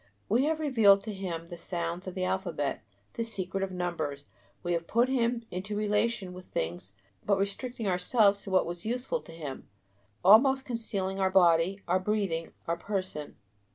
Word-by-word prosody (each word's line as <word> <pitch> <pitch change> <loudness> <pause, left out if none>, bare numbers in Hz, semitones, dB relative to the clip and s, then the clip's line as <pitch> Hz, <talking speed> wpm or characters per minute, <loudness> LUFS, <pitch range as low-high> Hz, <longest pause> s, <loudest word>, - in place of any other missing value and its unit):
We 240 +6 +3
have 315 +1 0
revealed 225 -10 +5
to 215 +1 -5
him 170 -4 -5
the 175 - -8
sounds 170 +1 -3
of 185 - -5
the 185 - -1
alphabet, 175 -6 -1 0.3
the 230 - -2
secret 195 -4 -2
of 195 -1 -2
numbers, 160 -6 -3 0.4
we 175 - 0
have 170 0 -2
put 240 +3 +3
him 240 -2 +1
into 195 +4 -4
relation 210 -2 0
with 180 0 -10
things 90 +4 -4 0.3
but 200 -1 +2
restricting 220 +4 -2
ourselves 200 +2 +3
to - - -8
what 190 -1 +3
was 170 0 -5
useful 250 - -2
to - - -13
him, 150 -5 -7 0.6
almost 265 +7 +7
concealing 200 -5 -2
our 190 -1 +3
body, 180 +1 +4
our 180 +2 +3
breathing, 185 -5 -1
our 170 +1 -1
person. 185 -6 -4
190 Hz, 170 wpm, -29 LUFS, 175-220 Hz, 0.6 s, almost